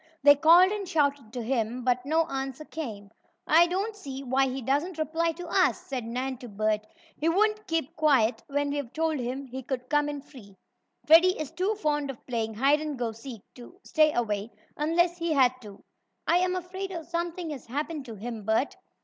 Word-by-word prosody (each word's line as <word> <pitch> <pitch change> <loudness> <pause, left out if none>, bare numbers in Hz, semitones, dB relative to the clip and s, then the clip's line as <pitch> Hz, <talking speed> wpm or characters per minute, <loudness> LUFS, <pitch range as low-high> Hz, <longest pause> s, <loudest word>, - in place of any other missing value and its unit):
They 285 0 +9
called 335 +6 +6
and 405 -3 -4
shouted 285 - 0
to 245 -2 -4
him, 240 0 -1
but 250 +1 0
no 320 +2 +3
answer 270 -1 -5
came. 215 -12 -7 0.3
"I 335 +2 +6
don't 395 +5 -2
see 275 -8 -7
why 265 +1 +2
he 260 +1 -3
doesn't 290 +8 -1
reply 325 +2 0
to 350 +2 -8
us," 365 +1 +2
said 270 -10 -5
Nan 255 +2 -3
to 245 -2 -9
Bert. 215 +1 -1 0.3
"He 320 - +1
wouldn't 425 +3 +1
keep 330 -2 -2
quiet 270 -7 +3
when 285 0 -1
we've 285 -4 -3
told 320 -2 0
him 255 +3 -4
he 260 +1 -7
could 255 -1 -5
come 295 0 +2
in 290 -1 -5
free. 210 -10 -15 0.5
Freddie 340 +4 +6
is 305 -2 -4
too 370 +6 -1
fond 295 -7 -1
of 265 - -8
playing 225 -3 -2
hide 280 +6 +3
and 300 -3 -4
go 240 -2 -2
seek 230 -1 -10
to 255 +10 -13
stay 310 -1 +3
away, 215 -4 -1 0.3
unless 345 +3 +1
he 335 -1 0
had 260 -3 +4
to. 205 -3 -12 0.4
I 345 - +4
am 365 0 +1
afraid 375 +2 -5 0.2
something 340 -1 -3
has 275 -5 -8
happened 295 +3 -3
to 230 -3 -8
him, 225 +2 -6
Bert." 220 +6 +1
285 Hz, 195 wpm, -27 LUFS, 245-330 Hz, 0.5 s, They